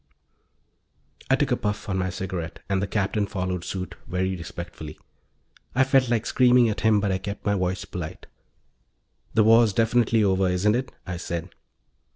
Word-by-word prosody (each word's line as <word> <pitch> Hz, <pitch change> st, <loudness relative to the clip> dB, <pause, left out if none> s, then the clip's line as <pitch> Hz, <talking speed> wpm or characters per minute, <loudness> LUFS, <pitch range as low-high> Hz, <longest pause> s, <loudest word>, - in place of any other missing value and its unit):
I 135 Hz, -, +5 dB
took 135 Hz, 0 st, 0 dB
a -, -, +4 dB
puff 105 Hz, -2 st, -3 dB
on 95 Hz, -2 st, -1 dB
my 95 Hz, 0 st, 0 dB
cigarette, 90 Hz, -3 st, -5 dB
and 95 Hz, -1 st, 0 dB
the 100 Hz, -, -1 dB
Captain 105 Hz, 0 st, 0 dB
followed 90 Hz, -3 st, -3 dB
suit, 90 Hz, 0 st, -5 dB
very 95 Hz, +1 st, -1 dB
respectfully. 85 Hz, -2 st, -8 dB, 0.8 s
I 130 Hz, -, +5 dB
felt 130 Hz, -1 st, +3 dB
like 115 Hz, -2 st, +1 dB
screaming 125 Hz, -2 st, +4 dB
at 105 Hz, -, -3 dB
him 110 Hz, -1 st, +4 dB
but 100 Hz, -1 st, 0 dB
I 95 Hz, -, 0 dB
kept 100 Hz, +1 st, -6 dB
my 105 Hz, -, +2 dB
voice 95 Hz, -1 st, -1 dB
polite. 85 Hz, -3 st, -7 dB, 1.1 s
"The 110 Hz, -, +5 dB
war's 115 Hz, -1 st, +5 dB
definitely 115 Hz, +1 st, +3 dB
over, 95 Hz, -1 st, +2 dB
isn't 95 Hz, +4 st, +2 dB
it?" 130 Hz, +1 st, -2 dB
I 90 Hz, -2 st, -4 dB
said. 85 Hz, 0 st, -4 dB
100 Hz, 170 wpm, -25 LUFS, 90-115 Hz, 1.1 s, I